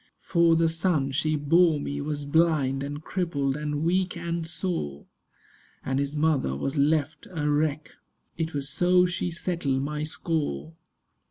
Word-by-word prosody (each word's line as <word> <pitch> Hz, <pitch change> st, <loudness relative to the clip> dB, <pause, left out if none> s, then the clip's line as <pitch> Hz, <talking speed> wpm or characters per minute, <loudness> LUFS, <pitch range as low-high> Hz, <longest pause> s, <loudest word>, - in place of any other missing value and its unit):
For 170 Hz, -2 st, +3 dB
the 165 Hz, 0 st, +3 dB
son 160 Hz, -4 st, +1 dB
she 155 Hz, +3 st, +1 dB
bore 155 Hz, +2 st, +3 dB
me 145 Hz, 0 st, -4 dB
was 145 Hz, 0 st, -3 dB
blind 145 Hz, -3 st, +2 dB
And 145 Hz, +2 st, -5 dB
crippled 145 Hz, -8 st, -1 dB
and 150 Hz, 0 st, -2 dB
weak 180 Hz, +1 st, +1 dB
and 170 Hz, -1 st, -3 dB
sore! 160 Hz, -, -3 dB, 0.8 s
And 135 Hz, +1 st, 0 dB
his 140 Hz, +1 st, -2 dB
mother 150 Hz, -, +1 dB
was 135 Hz, -, -2 dB
left 150 Hz, +1 st, +1 dB
a 160 Hz, -5 st, -2 dB
wreck. 150 Hz, 0 st, 0 dB, 0.4 s
It 160 Hz, -2 st, -3 dB
was 140 Hz, -1 st, -2 dB
so 180 Hz, +5 st, +4 dB
she 175 Hz, 0 st, -2 dB
settled 165 Hz, -6 st, -1 dB
my 150 Hz, +1 st, -3 dB
score. 150 Hz, -, -2 dB
150 Hz, 150 wpm, -26 LUFS, 140-170 Hz, 0.8 s, so